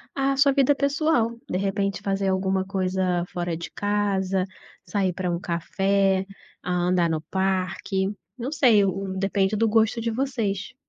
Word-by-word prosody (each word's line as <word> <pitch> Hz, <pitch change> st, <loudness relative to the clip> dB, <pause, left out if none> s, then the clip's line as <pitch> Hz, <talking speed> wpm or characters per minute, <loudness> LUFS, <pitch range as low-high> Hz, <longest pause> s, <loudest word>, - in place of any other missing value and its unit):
à 275 Hz, 0 st, +1 dB
sua 280 Hz, 0 st, +5 dB
vida 275 Hz, +1 st, +4 dB
pessoal. 280 Hz, -4 st, +1 dB, 0.2 s
De 180 Hz, -, 0 dB
repente, 195 Hz, -1 st, -1 dB
fazer 195 Hz, -1 st, 0 dB
alguma 190 Hz, 0 st, 0 dB
coisa 185 Hz, -2 st, 0 dB
fora 175 Hz, -1 st, -2 dB
de 170 Hz, -, -6 dB
casa, 195 Hz, -2 st, 0 dB, 0.4 s
sair 190 Hz, -3 st, 0 dB
pra 180 Hz, 0 st, -2 dB
um 170 Hz, -, -1 dB
café, 195 Hz, +2 st, +1 dB, 0.4 s
hã, 180 Hz, -1 st, 0 dB
andar 175 Hz, -2 st, +2 dB
no 155 Hz, -1 st, -1 dB
parque, 190 Hz, 0 st, 0 dB, 0.3 s
não 250 Hz, +4 st, -4 dB
sei, 235 Hz, -9 st, +5 dB
o, 190 Hz, 0 st, -2 dB
depende 195 Hz, +1 st, +1 dB
do 225 Hz, +2 st, +2 dB
gosto 225 Hz, +1 st, +2 dB
de 230 Hz, -, -1 dB
vocês. 230 Hz, -4 st, -2 dB
195 Hz, 155 wpm, -25 LUFS, 185-220 Hz, 0.4 s, sua